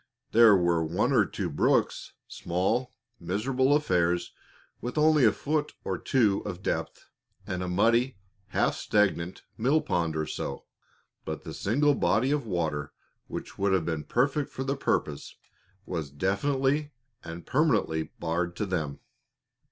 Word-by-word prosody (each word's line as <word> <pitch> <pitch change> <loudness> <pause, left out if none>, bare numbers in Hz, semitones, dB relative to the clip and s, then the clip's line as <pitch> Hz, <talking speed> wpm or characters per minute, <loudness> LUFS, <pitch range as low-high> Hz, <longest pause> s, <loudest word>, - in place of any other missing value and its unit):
There 115 -2 +7
were 85 -2 +2
one 80 +2 0
or - - +4
two - - -3
brooks - - +1
small, 95 +9 -1 0.3
miserable 125 +10 +1
affairs 90 - +1 0.5
with 125 +5 -5
only 150 -2 +5
a - - +6
foot 150 0 -2
or - - -2
two 110 -7 +2
of 95 -2 -6
depth, - - -3 0.4
and 90 -3 -3
a 90 - -3
muddy, 115 +7 +2 0.3
half - - +1
stagnant 95 -4 0 0.2
mill 135 +7 +3
pond 85 - -1
or 80 0 -1
so; 70 -2 -5 0.6
but - - -5
the - - -7
single 145 +8 +2
body 110 +4 +2
of 145 -5 -1
water 80 -6 -2 0.3
which - - -7
would 100 0 +2
have 90 -4 +1
been 80 -3 -2
perfect 140 - 0
for 130 - -5
the 135 +1 -1
purpose 75 - -2 0.5
was 80 -5 -4
definitely 135 - 0 0.3
and 85 +1 -8
permanently 105 - +1
barred 85 +2 -1
to 105 - -2
them. 80 -7 -3
100 Hz, 145 wpm, -28 LUFS, 85-135 Hz, 0.6 s, There